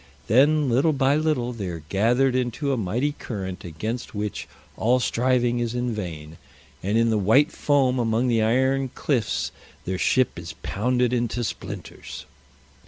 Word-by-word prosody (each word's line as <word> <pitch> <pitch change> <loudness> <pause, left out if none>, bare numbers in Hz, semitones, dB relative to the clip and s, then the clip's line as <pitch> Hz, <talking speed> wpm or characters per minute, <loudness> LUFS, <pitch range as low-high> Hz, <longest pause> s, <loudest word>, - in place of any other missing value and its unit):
Then 145 +6 +4
little 135 +6 +3
by 135 0 +2
little 150 -6 0
they 105 -5 -5
are 85 -3 -6
gathered 120 +6 +2
into 130 +3 -1
a - - +2
mighty 120 +7 0
current 95 -10 -6
against 110 +9 -5
which 105 0 -4 0.3
all 125 +3 +2
striving 120 -1 +1
is 120 0 -2
in 120 -1 -1
vain, 80 -6 -6 0.4
and 100 +4 0
in 115 0 +3
the 110 - +2
white 135 - +4
foam 135 -3 +2
among 115 +1 +1
the 115 -2 +2
iron 130 +4 +2
cliffs 120 -8 -1 0.3
their 95 +1 -2
ship 125 +6 +2
is 85 -2 -8
pounded 125 +3 0
into 120 0 -1
splinters. 105 - -7
120 Hz, 155 wpm, -24 LUFS, 105-130 Hz, 0.4 s, Then